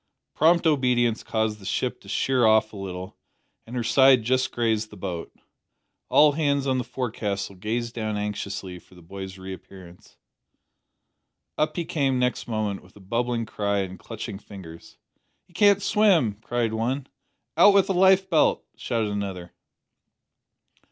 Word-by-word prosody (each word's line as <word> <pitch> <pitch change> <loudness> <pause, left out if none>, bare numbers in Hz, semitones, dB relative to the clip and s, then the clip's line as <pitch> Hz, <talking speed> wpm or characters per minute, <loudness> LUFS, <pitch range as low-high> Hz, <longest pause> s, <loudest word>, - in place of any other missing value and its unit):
Prompt 170 +3 +3
obedience 125 -6 +2
caused 110 -1 -1
the 95 - -13
ship - - -2
to - - -14
sheer 130 -2 +1
off 110 0 +4
a - - -9
little, 95 -2 -7 0.5
and 120 - -8
her 120 - -1
side 130 +1 +5
just 130 +3 +1
grazed 110 -2 0
the - - -13
boat. 90 -4 -5 0.8
All 150 0 +6
hands 140 -2 0
on 130 -1 +1
the - - -2
forecastle 105 -7 -4
gazed 115 +5 -3
down 110 -2 -3
anxiously 100 -3 -5
for 90 - -21
the 90 - -16
boy's 95 +2 -8
reappearance. 95 -1 -12 1.4
Up 155 - 0
he 170 - -2
came 135 -5 0
next 125 0 -1
moment 110 -3 -2
with 95 - -21
a - - -14
bubbling 115 +4 -2
cry 100 -2 -1
and 95 -1 -6
clutching 95 - -7
fingers. 90 -6 -12 0.5
"He 175 - -26
can't 200 +2 +4
swim!" 195 - +3
cried 120 -1 -1
one. 125 +5 -2 0.5
"Out 195 +5 +6
with 195 - +4
a 195 - 0
lifebelt!" 190 -2 +3
shouted 115 -4 -2
another. 95 -4 -5
115 Hz, 150 wpm, -25 LUFS, 100-135 Hz, 1.4 s, All